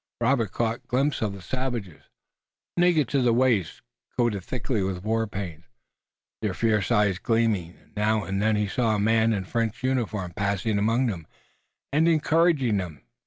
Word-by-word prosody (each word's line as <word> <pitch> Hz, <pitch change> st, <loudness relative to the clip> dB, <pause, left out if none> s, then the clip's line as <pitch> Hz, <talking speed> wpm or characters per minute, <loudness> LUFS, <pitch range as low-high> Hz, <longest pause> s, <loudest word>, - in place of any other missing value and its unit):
Robert 115 Hz, -3 st, +1 dB
caught 115 Hz, 0 st, -2 dB
glimpses 135 Hz, +4 st, 0 dB
of 105 Hz, -3 st, -1 dB
the 100 Hz, -2 st, -10 dB
savages, 120 Hz, -6 st, -4 dB, 0.7 s
naked 175 Hz, -6 st, +3 dB
to 140 Hz, -1 st, +2 dB
the 125 Hz, -1 st, +3 dB
waist, 115 Hz, -, +1 dB, 0.3 s
coated 115 Hz, -6 st, +1 dB
thickly 120 Hz, 0 st, -2 dB
with 95 Hz, -1 st, -3 dB
war 110 Hz, +1 st, 0 dB
paint, 90 Hz, -6 st, -6 dB, 0.8 s
their 105 Hz, -4 st, -1 dB
fierce 105 Hz, -2 st, +1 dB
eyes 105 Hz, -4 st, +3 dB
gleaming, 110 Hz, -7 st, 0 dB
and -, -, -28 dB
now 105 Hz, 0 st, +1 dB
and 95 Hz, +1 st, -2 dB
then 110 Hz, 0 st, +2 dB
he 105 Hz, 0 st, 0 dB
saw 110 Hz, +1 st, +1 dB
a -, -, -1 dB
man 110 Hz, +2 st, +3 dB
in 100 Hz, -4 st, -1 dB
French 115 Hz, +3 st, -2 dB
uniform 110 Hz, -8 st, -1 dB
passing 100 Hz, +1 st, 0 dB
among 115 Hz, +5 st, +2 dB
them 90 Hz, -9 st, -3 dB, 0.7 s
and 155 Hz, +3 st, +4 dB
encouraging 160 Hz, -7 st, +3 dB
them. 90 Hz, -5 st, -5 dB
110 Hz, 165 wpm, -26 LUFS, 100-125 Hz, 0.8 s, and